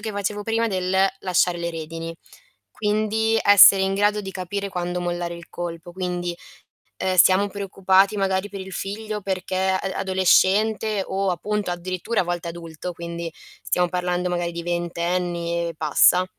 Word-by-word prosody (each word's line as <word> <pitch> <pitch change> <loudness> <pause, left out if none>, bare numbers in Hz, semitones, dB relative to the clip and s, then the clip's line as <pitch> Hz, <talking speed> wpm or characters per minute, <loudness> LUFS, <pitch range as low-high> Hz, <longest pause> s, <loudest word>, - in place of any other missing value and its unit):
che 220 0 -4
facevo 205 +1 -3
prima 225 +1 0
del 185 -2 -1 0.2
lasciare 180 -1 +1
le 170 0 -2
redini. 165 +1 -6 0.7
Quindi, 215 +1 +1
essere 200 -1 +8
in 195 0 0
grado 205 +1 +1
di 190 -1 -7
capire 195 +2 -4
quando 180 -1 -3
mollare 175 -1 -3
il 170 - -12
colpo. 175 0 -6
Quindi, 175 -1 -3 0.7
uhm: 185 0 +1
"Siamo 185 +3 +5
preoccupati 195 0 +2
magari 190 +1 0
per 200 0 -7
il 190 0 -9
figlio 210 +2 -4
perché 185 -1 -3
a 190 - +2 0.2
adolescente", 195 +3 +2
o 195 0 -1
appunto 205 +3 -2
addirittura 185 +5 -2
a - - -1
volte 175 0 -3
adulto, 170 +1 -7
quindi, 170 0 -6 0.3
stiamo 180 -1 +1
parlando 180 0 -1
magari 175 -1 -1
di 170 0 -6
ventenni 170 0 -2
e 165 - -7
passa. 160 +4 +4
185 Hz, 155 wpm, -23 LUFS, 175-200 Hz, 0.7 s, essere